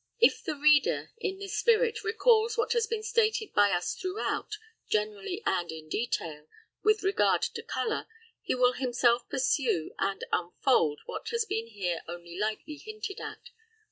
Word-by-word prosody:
If 470 0 +4
the - - -2
reader, 295 0 +3
in 385 -4 -2
this 395 0 -5
spirit, 460 -1 +2
recalls 445 +1 +3
what 465 0 +1
has 470 -2 +1
been 435 -1 -3
stated 435 -1 +1
by 205 0 +5
us 175 -2 0
throughout, 395 +2 -3 0.3
generally 215 - -1
and 175 -1 0
in 160 -1 -9
detail, 155 -10 -3 0.3
with 430 0 +3
regard 390 +1 +3
to - - -2
colour, 445 -1 -2 0.3
he - - -1
will 250 0 +4
himself 245 -2 +1
pursue 260 - 0
and 195 0 -1
unfold 170 - +1
what - - -6
has 465 -1 0
been 225 - -2
here 185 -6 -3
only 170 0 -8
lightly 215 - -3
hinted 430 -1 -7
at. - - -8
280 Hz, 155 wpm, -29 LUFS, -, 0.3 s, by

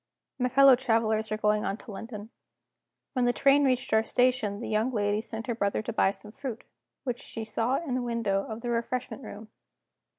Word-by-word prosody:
My 250 0 +1
fellow 275 +1 +7
travelers 225 -3 +1
were 215 - -1
going 210 0 +2
on 195 - -2
to 225 - -11
London. 215 +1 -8 0.8
When 255 -2 +1
the 245 - +4
train 280 +2 +4
reached 260 -2 +1
our 220 0 +5
station 245 -4 +1
the 240 - -5
young 220 +4 +1
lady 205 -2 0
sent 225 0 -7
her 240 - -1
brother 200 -1 -1
to 230 - -4
buy 195 - +3
some 210 +1 -9
fruit, 235 -1 -6 0.4
which 245 -3 -3
she 225 - -6
saw 225 +4 0
in 285 -4 -2
the 255 - 0
window 230 -5 0
of 220 +1 -6
the 240 0 -2
refreshment 245 +3 -2
room. 215 0 -9
230 Hz, 200 wpm, -28 LUFS, 215-250 Hz, 0.8 s, fellow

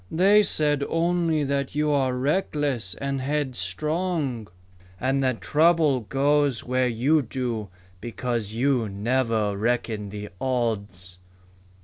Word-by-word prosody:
"They 195 +5 +5
said 150 -7 +1
only 165 -2 +1
that 140 0 -2
you 150 0 +1
are 135 -3 +1
reckless 140 - -1
and 140 -1 -3
headstrong, 145 - -2 0.5
and 135 +2 +1
that 130 -3 0
trouble 155 -3 +3
goes 140 +2 +1
where 125 0 +1
you 130 +7 +2
do 120 -4 -4 0.3
because 115 -1 -3
you 125 -3 +1
never 110 0 0
reckon 110 -1 -1
the 105 +1 -7
odds." 100 -8 -2
130 Hz, 110 wpm, -25 LUFS, 115-150 Hz, 0.5 s, They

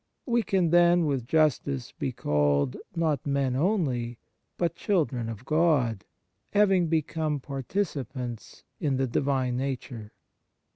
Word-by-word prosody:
We 240 -2 +2
can 185 -5 +1
then, 175 0 +5
with 135 -5 -1
justice, 140 -4 +1
be 130 - -3
called, 75 - +1 0.2
not 155 -5 0
men 140 -3 0
only, 135 - 0 0.4
but 170 -1 0
children 145 - 0
of 115 +2 -8
God, 145 - +2 0.5
having 195 -4 +4
become 155 -1 -1
participants 130 - -4 0.2
in 140 -4 0
the 135 - +1
Divine 130 -1 0
Nature. 125 -5 -4
140 Hz, 115 wpm, -27 LUFS, 125-165 Hz, 0.5 s, then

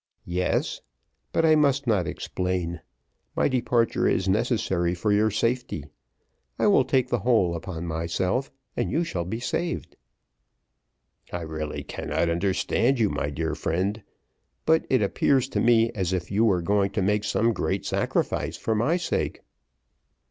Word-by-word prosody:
"Yes; 90 +1 -1 0.5
but 165 - +2
I 160 - +6
must 140 -2 +2
not 100 -8 +1
explain; 90 -2 -3 0.5
my - - +3
departure 120 -3 +1
is 95 - +1
necessary 95 -5 +1
for 105 +4 0
your 105 +2 +3
safety: 115 - -1 0.7
I - - +1
will 205 -1 +5
take 130 -3 +1
the 120 - +1
whole 105 -6 +2
upon 85 0 -5
myself, 85 +9 -1 0.2
and - - -1
you 165 - +1
shall 90 - -3
be 110 +6 -4
saved." 170 +7 -3 1.4
"I 90 - -3
really 80 -2 -4
cannot 85 - -2
understand 100 +8 +1
you, 105 -3 +2
my 75 - -2
dear 80 +3 -2
friend; 95 +6 -1 0.6
but 160 0 +3
it 130 -5 +3
appears 130 +6 +2
to - - -1
me, 115 -1 +4
as 95 -3 -2
if 90 -1 -3
you 105 +3 +3
were 90 -6 +2
going 100 +1 +2
to 100 - 0
make 105 +2 +1
some 110 +3 +1
great 95 +1 -2
sacrifice - - -1
for 110 - -1
my 120 +11 +2
sake." 175 - -2
105 Hz, 150 wpm, -26 LUFS, 90-120 Hz, 1.4 s, I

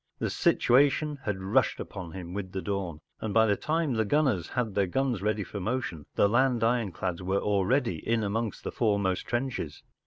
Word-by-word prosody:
The - - -2
situation 145 +3 +3
had 105 -2 -1
rushed 95 - +2
upon 90 -4 -7
him 90 -2 -7
with 95 -1 -5
the 95 - -2
dawn, 95 -6 -3 0.2
and 110 -1 -4
by 110 0 +6
the 105 -2 +3
time 155 +3 0
the 110 -1 +2
gunners 115 - +1
had 120 -4 -2
their 100 -1 +2
guns 125 +1 0
ready 105 0 0
for 100 +3 -6
motion, 100 - -3
the - - +5
land 120 +1 +2
ironclads 105 -6 0
were 95 +2 0
already 105 - +1
in 115 +6 0
among 110 +2 -1
the - - -3
foremost 100 -5 0
trenches. 120 - -3
105 Hz, 185 wpm, -28 LUFS, 95-120 Hz, 0.2 s, by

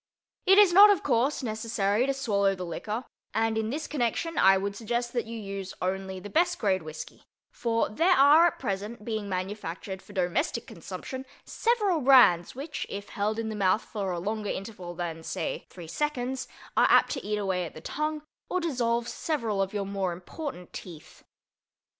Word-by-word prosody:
It 385 +1 +7
is 405 -4 +7
not, 405 +3 +10
of 405 -4 +3
course, 260 +2 +1
necessary 220 0 0
to 275 - +1
swallow 200 -7 +1
the 185 -1 -5
liquor 215 +8 -4 0.3
and 225 0 +1
in 220 0 -1
this 300 +5 -3
connection 300 +4 -1
I 195 0 +6
would 200 +1 -3
suggest 240 +3 -2
that 240 -2 -1
you 230 0 -6
use 195 -2 -6
only 190 0 -3
the 205 - -8
best 350 +2 +2
grade 190 -4 +1
whisky, 155 0 -8 0.3
for 230 -1 0
there 340 - +3
are 295 +5 +7
at 340 - -3
present 210 0 -4
being 215 -3 -3
manufactured 190 0 -4
for 205 - -15
domestic 185 - 0
consumption 260 -1 -7 0.2
several 420 -8 +1
brands 245 -11 +6
which, 280 +2 -5
if 200 0 -6
held 210 +2 -1
in 225 -1 -2
the 215 - -4
mouth 195 0 +2
for 200 -4 -4
a 175 - -2
longer 210 +3 -3
interval 185 -3 -6
than, 165 -2 -4
say, - - -4
three 175 -2 -10
seconds, 260 - -2 0.3
are - - +5
apt - - +5
to 270 - -3
eat 210 +1 -1
away 185 -4 -1
the 155 - -11
tongue 305 - -3 0.3
or 365 - 0
dissolve 240 -8 0
several 230 -12 -1
of 195 0 -1
your 205 -1 -2
more 195 -2 -2
important 180 - -7
teeth. 165 -3 -10
220 Hz, 180 wpm, -28 LUFS, 195-265 Hz, 0.3 s, not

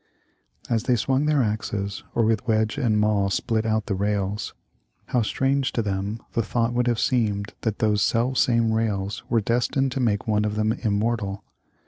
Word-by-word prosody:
As 115 -1 0
they 125 - +3
swung 135 +5 +1
their 150 -4 +3
axes, 105 -2 -3
or 115 - +3
with 110 -1 0
wedge 110 +4 +1
and 110 -5 +2
maul 105 -2 +2
split 110 +2 0
out 110 -1 0
the 105 - -2
rails, 100 +1 -2 0.5
how 125 - +2
strange 135 +5 0
to 115 - 0
them 100 +2 -2
the 115 - +2
thought 115 +2 0
would 125 0 +1
have 120 -2 +1
seemed 105 -5 0
that 110 -3 -1
those 105 -2 +2
self 125 +5 +1
same 115 -2 +3
rails 105 -3 -1
were 115 -2 +2
destined 125 +4 0
to 135 - -3
make 110 -5 0
one 105 -1 +2
of 105 0 -1
them 110 +1 +1
immortal. 105 -2 -1
110 Hz, 180 wpm, -24 LUFS, 105-120 Hz, 0.5 s, they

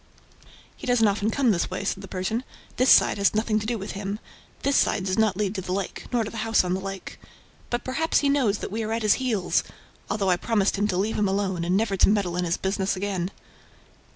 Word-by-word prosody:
"He - - -9
doesn't 245 -3 +4
often 205 +1 +1
come 255 0 +2
this 175 -4 0
way," 185 - -4
said 195 0 -2
the 195 - -9
Persian. 190 +6 -2 0.3
"This 255 +1 +3
side - - +6
has 200 +1 +3
nothing 215 0 +1
to 215 - -5
do 235 0 -1
with 195 -1 -6
him. 200 +1 -4 0.5
This 280 0 +2
side 190 - +2
does 185 -1 0
not 215 -4 +2
lead 205 -2 0
to 195 - -3
the 180 - -6
lake 195 0 -4
nor 240 -2 +2
to 215 - -6
the 230 - -7
house 225 -1 +2
on 180 0 -1
the 190 - -1
lake... 195 0 -7 0.5
But 240 0 -2
perhaps 315 +6 +1
he 285 - +2
knows 260 -8 +2
that - - -6
we 220 +2 -2
are 220 0 -2
at 225 0 -2
his 215 +5 +3
heels... 220 -8 +1 0.5
although 195 -3 +1
I 180 - +3
promised 205 -1 +1
him 205 +1 +1
to 180 - -1
leave 210 +4 0
him 210 - +2
alone 190 -3 -1
and 180 +2 +1
never 210 -2 0
to - - +5
meddle 200 -4 +1
in 180 0 0
his 170 0 0
business 190 0 -1
again!" 190 -2 -2
205 Hz, 245 wpm, -25 LUFS, 190-225 Hz, 0.5 s, side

